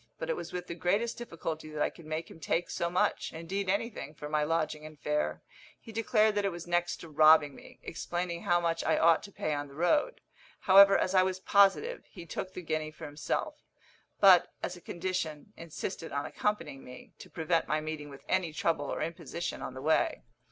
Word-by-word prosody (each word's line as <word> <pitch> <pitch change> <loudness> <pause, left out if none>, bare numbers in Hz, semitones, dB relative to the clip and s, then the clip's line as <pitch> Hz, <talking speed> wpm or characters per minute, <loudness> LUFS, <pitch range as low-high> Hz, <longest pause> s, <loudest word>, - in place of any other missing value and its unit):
But - - -3
it - - 0
was - - -7
with 180 0 -4
the 170 - -5
greatest 200 +8 0
difficulty 165 -8 -5
that 155 -1 -5
I - - 0
could 165 - -14
make 155 +1 -4
him - - -13
take 165 +2 -1
so 170 - -1
much 180 +1 0
indeed 185 +4 -3
anything 200 - -2
for 150 - -7
my 150 0 +1
lodging 155 -1 -1
and 155 -1 -11
fare. 150 +1 -1 0.4
He 225 - -12
declared 220 -1 +2
that 205 0 0
it 200 - +2
was 170 -1 -7
next 175 0 0
to - - -9
robbing 155 -1 +6
me, - - -14
explaining 175 +1 -4
how 175 -4 +2
much 165 -1 -1
I - - +2
ought 165 0 +5
to 200 - -11
pay 155 - -2
on 145 0 -3
the 140 - -14
road. 295 - +1 0.4
However, 195 +1 +8
as 185 - 0
I 185 - +6
was 185 0 0
positive, 200 - +3
he 175 -4 -10
took 185 +3 -5
the 180 - -6
guinea 155 -1 -2
for 155 - -10
himself; 145 +1 -3 0.6
but, 190 -3 +7
as 180 - -3
a 175 - -13
condition, 175 0 -4
insisted 165 +1 -6
on 140 0 -2
accompanying 165 -10 -2
me, 125 0 -12
to - - -11
prevent 165 0 0
my 155 +2 +1
meeting 155 -1 -5
with 140 -1 -12
any 185 -3 +1
trouble 155 -1 0
or - - -2
imposition 170 +1 -5
on 130 - -6
the 130 - -7
way. 155 - +1
170 Hz, 210 wpm, -30 LUFS, 155-185 Hz, 0.6 s, However